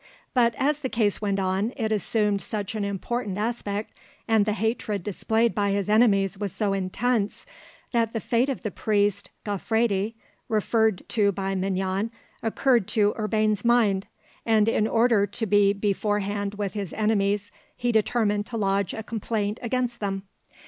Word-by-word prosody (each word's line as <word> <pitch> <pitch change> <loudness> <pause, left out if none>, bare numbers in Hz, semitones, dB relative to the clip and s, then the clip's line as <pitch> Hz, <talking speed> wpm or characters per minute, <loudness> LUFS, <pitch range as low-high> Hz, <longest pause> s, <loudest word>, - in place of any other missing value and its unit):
But 235 -2 +3
as 290 +2 +1
the 265 -3 -3
case 215 -4 0
went 200 -2 0
on 195 +4 0
it 220 -3 -1
assumed 210 -1 +1
such 210 -3 -4
an 215 -2 -2
important 200 +1 -3
aspect, 210 -1 -3 0.3
and 220 -2 +3
the 210 - +2
hatred 220 -3 -1
displayed 220 +4 +1
by 205 -1 +1
his 200 0 -1
enemies 200 -3 +3
was 205 -2 -2
so 200 0 0
intense, 205 +3 -1 0.5
that 230 -2 +1
the 225 - -2
fate 245 +4 +1
of 265 - -3
the 215 - -2
priest 205 0 0 0.2
Gaufredi, 210 +1 0 0.3
referred 220 -2 +1
to 205 -3 +3
by 195 0 -2
Mignon, 190 +2 -1 0.3
occurred 230 -1 +2
to 210 -1 +2
Urbain's 215 -1 0
mind, 225 -5 +3 0.4
and 220 -2 +3
in 220 -1 +2
order 225 -3 +3
to 225 +3 -3
be 205 -1 +4
beforehand 205 0 -1
with 205 -2 -3
his 200 -4 -4
enemies 205 -1 +1 0.3
he 245 -1 0
determined 210 -2 +1
to 235 - -4
lodge 195 -2 0
a 220 - -5
complaint 215 -1 -2
against 245 0 -1
them. 195 -2 -2
210 Hz, 155 wpm, -25 LUFS, 200-225 Hz, 0.5 s, be